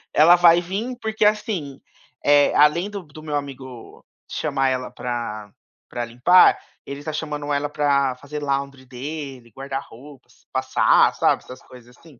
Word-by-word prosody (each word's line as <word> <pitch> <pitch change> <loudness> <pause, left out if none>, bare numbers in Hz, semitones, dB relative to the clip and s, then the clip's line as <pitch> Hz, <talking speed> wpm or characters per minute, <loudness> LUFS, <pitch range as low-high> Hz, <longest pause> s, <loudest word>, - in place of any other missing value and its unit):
Ela 165 +4 +7
vai 175 0 +5
vim 205 +8 -4
porque 220 -1 0
assim, 205 -10 -1 0.4
eh, 145 0 +4
além 150 +6 +3
do 200 -2 -7
do 155 0 -14
meu 150 -2 -4
amigo 130 -4 -8 0.3
chamar 135 -3 -1
ela 130 -1 -3
pra 115 -4 -5 0.4
pra 120 - -4
limpar, 125 +10 +5 0.3
ele 140 +1 -8
tá 155 - -5
chamando 150 -1 -4
ela 145 +1 -1
pra 140 -3 +1
fazer 145 +2 -7
laundry 140 -1 -3
dele, 135 -1 -8
guardar 135 +3 -5
roupas, 135 +4 -17
passar, - - +3
sabe - - +1
essas 130 0 -12
coisas 125 -1 -16
assim. 155 -7 -19
145 Hz, 155 wpm, -22 LUFS, 130-155 Hz, 0.4 s, Ela